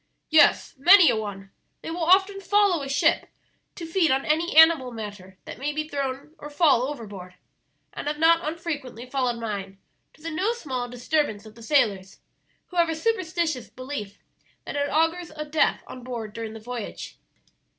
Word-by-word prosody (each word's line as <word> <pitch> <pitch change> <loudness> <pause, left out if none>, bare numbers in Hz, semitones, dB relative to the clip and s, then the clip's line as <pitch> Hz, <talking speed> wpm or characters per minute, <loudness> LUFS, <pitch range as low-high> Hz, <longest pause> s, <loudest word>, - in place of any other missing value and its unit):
"Yes, 310 -1 +4
many 360 +4 +7
a - - 0
one. 200 -3 -6 0.3
They - - -5
will 340 0 -3
often 385 +3 +3
follow 400 -4 +2
a 275 - -6
ship 280 +1 +2 0.5
to 340 - -7
feed 330 0 +1
on 265 +1 +1
any 320 +2 0
animal 320 -6 +6
matter 205 -4 -9
that - - -9
may 285 +3 -2
be 305 +1 -3
thrown 280 0 -4
or 295 - -8
fall 290 -5 +3
overboard, 200 -10 -8 0.6
and - - -6
have 295 0 -2
not 330 +2 +4
unfrequently 300 -7 -5
followed 250 -2 -1
mine, 200 -4 -5 0.4
to 310 - -22
the 330 - -4
no 380 +8 0
small 260 - -5
disturbance 245 -3 -1
of 215 - -12
the 230 - -16
sailors, 210 -8 +1 0.5
who 360 - -9
have 340 -1 +3
a 325 - -1
superstitious 330 - -1
belief 255 -7 -7 0.5
that - - -6
it 285 0 0
augurs 325 +2 0
a 305 0 -5
death 300 +1 +1
on 255 - -10
board 230 -4 -6
during 225 -1 -6
the 225 - -9
voyage." 240 0 -7
285 Hz, 175 wpm, -25 LUFS, 230-325 Hz, 0.6 s, many